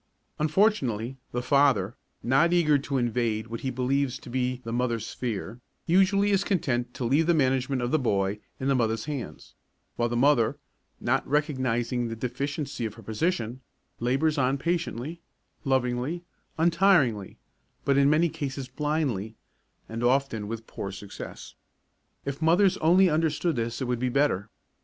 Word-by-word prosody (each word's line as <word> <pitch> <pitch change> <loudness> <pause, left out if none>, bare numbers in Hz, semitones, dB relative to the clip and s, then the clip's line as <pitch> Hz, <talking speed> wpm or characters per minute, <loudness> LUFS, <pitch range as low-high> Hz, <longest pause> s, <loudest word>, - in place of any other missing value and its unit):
Unfortunately, 150 - +1
the 120 0 -2
father, 130 -8 +3 0.3
not 135 +8 +3
eager 155 -5 +4
to 140 0 -2
invade 115 -3 0
what 115 0 -6
he 135 - -2
believes 130 +1 0
to 120 - -11
be 125 0 -1
the 115 -1 -5
mother's 120 -2 0
sphere, 120 0 -5 0.2
usually 195 +3 +3
is 195 -1 +3
content 125 -12 0
to - - -4
leave 145 +7 +3
the 170 - +4
management 130 -2 +1
of 120 - -1
the 155 - +3
boy 100 -4 0 0.2
in 130 - -2
the 140 - +3
mother's 115 -3 0
hands, 140 -5 -6 0.4
while 120 0 +1
the 120 - -1
mother, 125 -4 +3 0.4
not - - 0
recognising 130 -5 0
the 115 - -4
deficiency 135 +3 -3
of 110 -2 -3
her 115 - -13
position, 120 - -2 0.4
labours 140 +6 +1
on 130 +1 +2
patiently, 170 -1 -2 0.4
lovingly, 130 +5 0 0.3
untiringly, 165 - +3 0.5
but 140 - +3
in 140 0 +5
many 155 +3 +4
cases 140 -5 -4
blindly, 130 -7 -2 0.5
and 115 +1 -5
often 125 -4 +1
with 115 +1 -5
poor 100 - -6
success. 100 +1 -9 0.7
If 140 +2 -4
mothers 175 +4 +4
only 180 +4 +5
understood 160 0 +1
this 115 +2 -2
it - - -1
would 125 -1 -1
be 125 +1 0
better. 120 -7 +1
130 Hz, 150 wpm, -27 LUFS, 120-150 Hz, 0.7 s, in